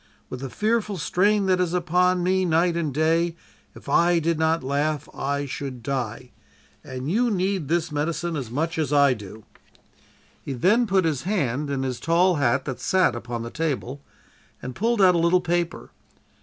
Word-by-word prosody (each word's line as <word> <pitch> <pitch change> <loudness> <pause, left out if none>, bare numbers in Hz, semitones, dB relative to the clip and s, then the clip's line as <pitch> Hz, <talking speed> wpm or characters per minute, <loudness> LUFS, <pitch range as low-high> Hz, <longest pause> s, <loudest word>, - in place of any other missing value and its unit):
With 130 - -5
the 135 0 -5
fearful 210 - -1
strain 200 +5 +2
that 185 -1 +2
is 180 -1 0
upon 180 +1 +2
me 185 +1 +2
night 170 0 +2
and 165 -4 -1
day, 165 +3 +1 0.4
if - - -14
I 175 0 +3
did 165 0 0
not 160 -1 +1
laugh 145 +2 -1
I 140 +1 -2
should 130 -3 -6
die, 125 -2 -4 0.5
and 130 +1 -6
you 240 +5 +2
need 190 -5 -1
this 170 +1 0
medicine 160 +3 -2
as 135 -6 -4
much 160 +6 -2
as 150 -3 -1
I 140 -2 +5
do.' 105 -1 -10 1.0
"He 140 - -5
then 210 - +2
put 190 -3 +2
his 150 -5 0
hand 150 - -1
in 135 -1 -2
his 130 -2 -3
tall 175 +1 +2
hat 130 -1 +1
that 135 -3 -5
sat 185 -10 +2
upon 120 0 -5
the 115 - -7
table, 140 -4 -3 0.6
and 125 - -7
pulled 225 - +1
out 180 -1 +6
a 170 - +1
little 170 +2 +3
paper. 175 0 -2
160 Hz, 180 wpm, -24 LUFS, 135-180 Hz, 1.0 s, out